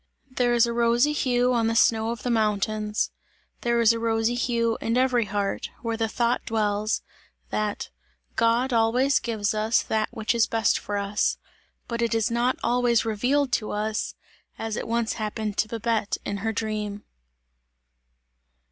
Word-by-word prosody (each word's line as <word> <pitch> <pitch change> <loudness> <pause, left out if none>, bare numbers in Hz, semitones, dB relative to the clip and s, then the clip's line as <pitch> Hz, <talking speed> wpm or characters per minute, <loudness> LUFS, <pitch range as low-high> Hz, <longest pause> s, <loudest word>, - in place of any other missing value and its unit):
There 245 -1 +1
is 235 0 +5
a 235 - -2
rosy 235 +4 +3
hue 250 -3 +2
on 230 -2 +2
the 225 - 0
snow 225 -1 +3
of 235 0 -5
the 245 - 0
mountains; 215 -1 0 0.5
there 235 0 +1
is 230 0 +5
a 230 - -3
rosy 225 0 +1
hue 235 -2 0
in 230 +2 0
every 250 -3 +2
heart, 205 -1 -2
where 230 -1 -1
the 225 0 0
thought 235 +2 0
dwells, 215 -1 0 0.5
that: 210 -1 -2 0.4
"God 235 +3 +2
always 245 +5 +3
gives 220 -3 -1
us 215 +2 +1
that 215 -1 -1
which 225 -1 -1
is 230 -1 +3
best 225 -2 +1
for 205 - -4
us!" 200 +1 0 0.5
but 235 -1 -3
it 235 -1 +1
is 225 0 +1
not 240 +2 +1
always 240 -2 +2
revealed 250 +6 +1
to 215 - 0
us, 215 +1 -2 0.4
as 225 -1 -3
it - - -4
once 230 0 0
happened 215 -1 -3
to 215 - +2
Babette 225 -1 -1
in 200 - -2
her 225 +3 -2
dream. 210 -2 -3
225 Hz, 165 wpm, -25 LUFS, 215-235 Hz, 0.5 s, is